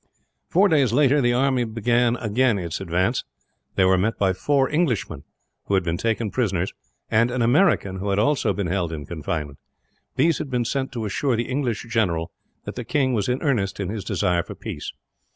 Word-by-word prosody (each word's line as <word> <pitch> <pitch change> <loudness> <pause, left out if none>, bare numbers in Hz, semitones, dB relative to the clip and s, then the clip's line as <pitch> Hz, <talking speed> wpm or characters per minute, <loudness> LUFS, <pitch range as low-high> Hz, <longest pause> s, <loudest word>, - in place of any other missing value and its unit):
Four 195 +4 +4
days 145 - +3
later, 145 +1 +4
the 120 -1 +2
army 130 0 +2
again 120 +1 +1
began 115 +1 +2
its 85 -1 -4
advance. 95 +6 0 0.5
They 95 - +4
were 95 0 +4
met 110 +5 0
by 95 -2 +2
four 135 +7 +1
Englishmen, 125 - -1 0.4
who 100 - +1
had 95 - +2
been 85 -1 -1
taken 115 0 -1
prisoners; 100 -7 -1 0.4
and 115 +2 +3
an 125 -1 0
American, 120 - +3
who 100 +2 -3
had 100 - +1
also 135 +5 +2
been 100 0 -2
held 90 -1 -1
in 75 -3 -6
confinement. 75 -2 -4 0.6
These 155 +4 +2
had 140 - -4
been 125 -2 0
sent 135 +3 -2
to 115 -3 -3
assure 125 +5 0
the 120 +1 -2
English 125 -4 -2
general 90 -8 0 0.3
that - - -6
the - - -5
king 135 -3 +1
was 105 0 0
in 125 +1 -1
earnest 110 -11 0
in 95 -2 -2
his 105 -1 -4
desire 90 -2 +1
for - - -9
peace. - - -6
115 Hz, 195 wpm, -23 LUFS, 95-130 Hz, 0.6 s, Four